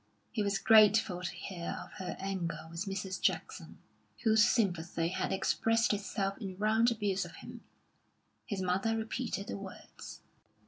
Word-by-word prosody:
He 220 - -1
was 200 -1 +1
grateful 215 -4 +5
to 180 - -3
hear 175 -3 -5
of - - -15
her 180 - -4
anger 170 -5 -3
with 170 +4 -4
Mrs. 190 -1 -4
Jackson, 165 -2 -2 0.5
whose 220 -1 +5
sympathy 175 -7 +1
had 185 - -2
expressed 225 +4 +2
itself 200 0 -2
in 190 -5 -6
round 220 +3 +3
abuse 205 -4 0
of - - -10
him. - - -10 0.9
His 195 -3 -2
mother 195 +5 +1
repeated 220 -2 -3
the - - -5
words. 195 -1 -10
195 Hz, 145 wpm, -32 LUFS, 185-220 Hz, 0.9 s, grateful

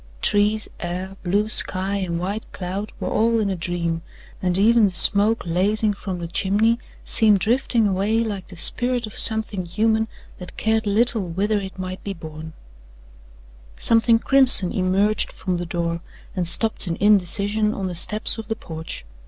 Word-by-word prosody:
Trees, 210 - +1
air, 180 +2 -5
blue 200 +4 0
sky 195 -2 +1
and 175 -3 -3
white 200 +5 -5
cloud 195 +3 -5
were - - -4
all 230 +1 +1
in 205 -2 -1
a - - -2
dream, 170 -1 -3 0.4
and 180 -1 +1
even 225 +2 +4
the - - +1
smoke 205 +4 +4
lazing 205 +5 +1
from 195 -2 -6
the 170 -1 -6
chimney 205 +6 +1 0.3
seemed 215 -2 +5
drifting 230 +2 +1
away 200 +3 0
like 210 -5 -3
the 190 - -12
spirit 245 +7 +3
of 215 - -11
something 220 -3 -1
human 220 +5 0 0.3
that 180 - -11
cared 220 0 0
little 220 -1 0
whither 205 +5 -1
it 190 -1 -9
might 185 0 -7
be 200 -1 -5
borne. 160 -1 -10 1.3
Something 230 0 +3
crimson 250 -7 +5
emerged 195 +3 0
from 185 -2 -4
the 175 0 -5
door 170 0 -3 0.4
and 180 -3 -2
stopped 220 +3 +1
in 165 - -2
indecision 205 +2 +1
on 200 -3 -5
the 185 - -4
steps 215 +6 0
of 220 - -8
the 225 - -3
porch. 160 - -8
200 Hz, 165 wpm, -21 LUFS, 180-220 Hz, 1.3 s, seemed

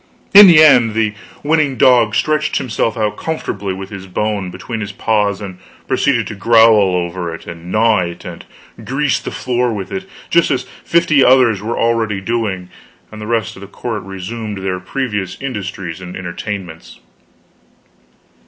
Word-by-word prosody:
In 205 0 +11
the 160 -3 +8
end, 120 -7 +5
the 110 -2 +1 0.3
winning 150 -3 +1
dog 120 -3 +4
stretched 155 0 0
himself 115 -2 -2
out 105 -2 -1
comfortably 105 -11 -4
with 95 +1 -7
his 95 -2 -8
bone 100 0 -2
between 115 +5 -6
his 105 -1 -5
paws, 105 -1 0
and 95 -3 -8 0.3
proceeded 120 -6 +1
to 110 - -6
growl 110 -2 +4
over 85 -1 -3
it, - - -13
and 85 +1 -9
gnaw 110 -1 +3
it, 85 -1 -5
and 85 -2 -8 0.4
grease 140 +2 0
the - - -6
floor 125 -1 -1
with 100 -4 -5
it, 190 0 -5 0.2
just 170 -1 +3
as 125 - 0 0.2
fifty 155 -4 +3
others 125 -6 +4
were 115 +3 -3
already 115 -3 0
doing; 100 -4 -3 0.4
and 110 0 -10
the 105 - -6
rest 115 -4 -1
of 95 - -13
the 100 - -9
court 110 +1 -5
resumed 100 +2 -6
their 95 -1 -2
previous 100 -2 -4
industries 95 -9 -5
and 90 -1 -8
entertainments. 90 -1 -7
110 Hz, 160 wpm, -16 LUFS, 95-125 Hz, 0.4 s, In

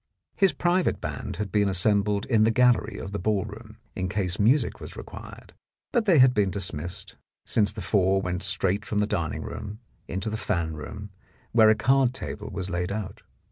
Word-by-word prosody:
His 195 -3 +4
private 175 +5 +1
band - - -5
had 105 -3 -4
been 100 0 +2
assembled 100 +2 +2
in 110 -4 +3
the 110 - +4
gallery 120 -2 +3
of 95 - -6
the 100 - -3
ballroom, 110 +2 -3 0.2
in 95 -3 -2
case 95 -1 -2
music 120 +8 +2
was - - -8
required, - - -10 0.4
but 240 -4 +1
they 185 -6 +5
had 130 -1 +7
been 105 -4 +2
dismissed, 90 -3 -5 0.3
since 105 -3 +2
the - - -7
four 95 -2 +2
went 90 -1 -3
straight 95 +2 0
from 105 - -3
the 105 - +3
dining 85 -8 -2
room 105 -1 -6 0.3
into 95 +4 -3
the 110 - -2
fan 85 -7 -1
room, 100 +6 -8 0.4
where 110 -2 +6
a 110 - +5
card 130 +2 +3
table 105 -4 -6
was 95 -2 -4
laid 90 0 -2
out. 100 -2 -5
105 Hz, 185 wpm, -26 LUFS, 95-110 Hz, 0.4 s, had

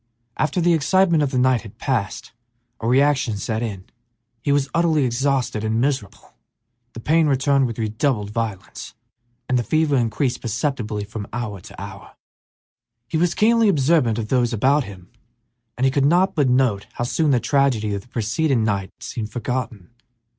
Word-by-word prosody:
After 155 +4 0
the 175 0 +3
excitement 170 +2 +3
of 145 - +1
the 130 - -2
night 125 -1 +3
had 105 -4 -13
passed 115 -8 -2 0.5
a 115 - -3
reaction 135 -3 +2
set 110 +3 -3
in; 100 -5 -5 0.6
he 145 - -3
felt 140 -1 +2
utterly 160 -3 +2
exhausted 125 -2 0
and 110 +1 0
miserable, 120 -7 -3 0.6
the - - -8
pain 160 +6 +2
returned 135 -1 +2
with 115 - -6
redoubled 110 -1 -1
violence, 110 -4 -5 0.5
and 130 -1 +2
the - - -1
fever 155 +2 +1
increased 120 +1 0
perceptibly 115 -2 -2
from 105 0 -7
hour 110 -5 -4
to - - -12
hour. 100 0 -10 0.9
He 160 - -1
was 175 0 +1
keenly 225 0 +4
observant 140 - +2
of 110 -2 -4
those 125 -2 +1
about 135 +5 +2
him, 95 -3 -12 0.7
and 130 - +1
he 135 - +3
could 140 0 +1
not 175 +6 +3
but 145 -5 +2
note 125 -6 +1
how - - -3
soon 150 +5 0
the 130 -3 +3
tragedy 125 -7 +1
of 100 - -3
the 105 - -22
preceding 120 +3 0
night 100 -3 -1
seemed 110 -2 -5
forgotten. 120 -5 -4
125 Hz, 170 wpm, -22 LUFS, 110-145 Hz, 0.9 s, keenly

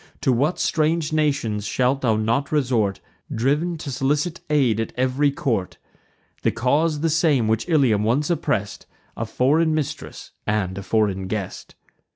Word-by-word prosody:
To 135 -3 +2
what 145 +9 +1
strange 155 0 0
nations 135 -9 0
shalt 130 +4 +1
not 115 +3 +1
thou 155 - +1
resort, 115 -8 +1 0.3
Driv'n 150 +9 0
to 150 -2 -6
solicit 145 +7 -1
aid 130 -8 +2
at 115 - -3
ev'ry 130 +3 +2
court! 120 -9 -2 0.6
The - - +2
cause 145 +6 +1
the 165 - +2
same 150 - +2
which 110 +8 0
Ilium 130 -10 +3
once 135 +9 +1
oppress'd; 140 - -2 0.3
A 115 - -4
foreign 155 +7 +2
mistress, 150 -1 -5 0.2
and 105 -4 0
a 100 - -5
foreign 95 -2 0
guest. 100 -1 -5
130 Hz, 150 wpm, -22 LUFS, 110-150 Hz, 0.6 s, Ilium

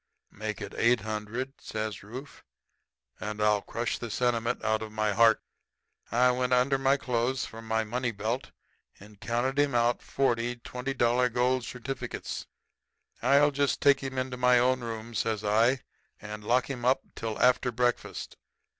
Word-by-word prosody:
"'Make 110 0 -5
it - - -6
eight 120 -1 +4
hundred,' 110 +5 -4
says 110 -2 -4
Rufe, 125 +8 -10 0.8
'and 105 0 -5
I'll 105 -1 +3
crush 115 +2 -3
the 120 - -5
sentiment 120 0 0
out 110 0 +1
of 110 -1 -6
my 110 0 0
heart.' 115 +1 +5 0.7
"I 125 +2 +4
went 125 0 0
under 130 +2 +3
my 135 +1 +3
clothes 125 0 -1
for 115 - -9
my 110 0 0
money 120 +3 -2
belt, 110 +5 -3 0.5
and 105 0 -15
counted 125 +4 0
him 145 -3 +2
out 120 0 +2
forty 120 -3 0
twenty 125 +2 -5
dollar 125 0 +3
gold 125 +1 +1
certificates. 130 +2 -5 0.7
"'I'll 145 +1 +5
just 140 0 +1
take 140 -1 +5
him 135 -1 -5
into 130 0 -2
my 125 0 +5
own 130 +1 +3
room,' 115 -1 -6
says 110 0 -1
I, 115 +5 +3 0.4
'and 105 0 -8
lock 125 +3 +2
him 125 -3 -5
up 130 +2 +3
till 110 -1 -4
after 125 0 +3
breakfast.' 120 +1 -2
120 Hz, 160 wpm, -29 LUFS, 110-130 Hz, 0.8 s, heart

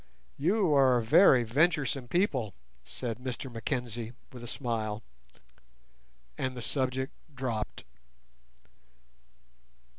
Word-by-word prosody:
"You 180 +2 +3
are 130 -3 +5
very 130 - +6
venturesome 140 +1 +1
people," 130 - 0 0.3
said 120 -2 -5
Mr 130 0 -5
Mackenzie, 120 0 -3 0.2
with 125 -1 -9
a - - -6
smile, 115 -4 -3 1.4
and 130 -1 -2
the - - -4
subject 130 +1 -1 0.2
dropped. 120 -5 -3
125 Hz, 90 wpm, -30 LUFS, 115-140 Hz, 1.4 s, very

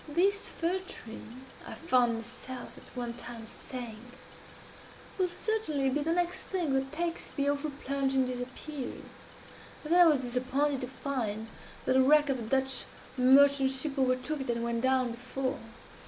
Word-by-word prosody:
'This 390 +7 +2
fir 345 +3 -1
tree,' 240 -7 -10 0.2
I - - -6
found 250 -7 +3
myself 245 +2 -7
at - - -14
one 240 -1 -3
time 235 -1 -8
saying, 235 -1 -7 1.2
'will 370 - +3
certainly 350 -8 0
be 295 +3 +1
the 320 +3 0
next 350 0 0
thing 345 -7 -1
that 270 0 0
takes 335 +2 -2
the 280 -1 -1
awful 285 +1 0
plunge 275 -1 -1
and 265 -1 +4
disappears,' 255 +2 -5 0.8
and 310 +2 0
then 355 - +7
I 340 - +9
was 290 -4 +3
disappointed 260 +3 0
to 250 - -3
find 230 -5 -3 0.4
that - - +3
the 260 - +6
wreck 295 +2 +5
of 265 -2 +1
a - - -5
Dutch 265 +3 +1 0.3
merchant 270 +1 +6
ship 270 +2 -2
overtook 260 +3 +1
it 265 - -5
and 235 -1 0
went 235 0 -1
down 260 -1 +2
before. 260 +3 -3
265 Hz, 165 wpm, -30 LUFS, 250-295 Hz, 1.2 s, I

